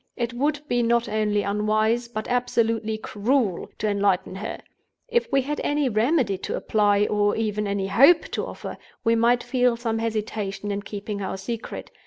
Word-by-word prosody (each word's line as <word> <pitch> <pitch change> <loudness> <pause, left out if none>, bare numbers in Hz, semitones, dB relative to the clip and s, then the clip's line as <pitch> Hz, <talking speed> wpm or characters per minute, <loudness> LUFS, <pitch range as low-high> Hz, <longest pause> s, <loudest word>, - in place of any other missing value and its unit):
It 235 -1 -2
would 290 +4 0
be 245 -3 +1
not 235 0 +2
only 210 -1 0
unwise, 215 +3 +1
but 215 -2 -5
absolutely 230 -3 0
cruel, 215 -2 0
to 215 - -1
enlighten 200 -3 +1
her. 210 - -5 0.5
If 475 -5 0
we 275 -1 +3
had 295 +3 -3
any 290 -2 +1
remedy 225 - +1
to - - -3
apply, 205 -1 +2
or 205 -1 +1
even 210 -1 -1
any 200 -1 -1
hope 275 - +6
to - - -2
offer, - - -7 0.2
we 230 -1 +3
might 235 +1 +3
feel 250 -2 +2
some 225 -1 -2
hesitation 215 -2 -3
in 200 0 -2
keeping 205 0 -5
our 190 - -3
secret. 230 +4 -6
220 Hz, 170 wpm, -24 LUFS, 205-245 Hz, 0.5 s, hope